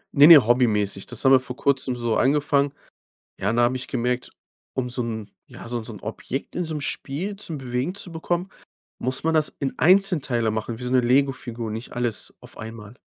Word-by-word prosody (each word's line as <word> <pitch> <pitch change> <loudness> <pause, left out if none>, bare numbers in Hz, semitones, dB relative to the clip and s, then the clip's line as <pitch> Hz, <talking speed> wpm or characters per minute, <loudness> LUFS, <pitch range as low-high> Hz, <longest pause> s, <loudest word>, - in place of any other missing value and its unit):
Ne, 145 +1 +9
ne, 155 -8 +10
hobbymäßig. 105 -5 +1
Das 120 +2 -7
haben 130 - +7
wir 135 - +8
vor 130 -1 -5
Kurzem 135 -2 +1
so 120 -2 0
angefangen. 140 +1 +2 0.7
Ja, 100 - +1
und 115 - 0
da 120 - +4
habe 120 +2 +2
ich 130 0 -4
gemerkt, 125 0 -2 0.4
um 125 -1 -1
so 125 - -2
'n 110 -3 -5 0.2
ja, - - -11
so 120 0 -3
'n - - -8
so 115 - -7
'n 105 - -10
Objekt 135 +3 -5
in 180 - -1
so 160 -2 -4
'nem 150 - -4
Spiel 160 +9 -3
zum 170 -6 -5
Bewegen 130 +6 -3
zu 185 -3 -4
bekommen, 175 +3 -2 0.5
muss 130 +2 -1
man 160 0 +1
das 155 -1 +2
in 135 -2 -2
Einzelteile 155 - +3
machen 110 +1 -3
wie 125 - -8
so 125 - -3
'ne 130 - +5
Lego-Figur, 120 -3 0
nicht 110 +3 -7
alles 120 -2 -3
auf - - -8
einmal. 110 -1 -9
125 Hz, 215 wpm, -24 LUFS, 115-145 Hz, 0.7 s, ne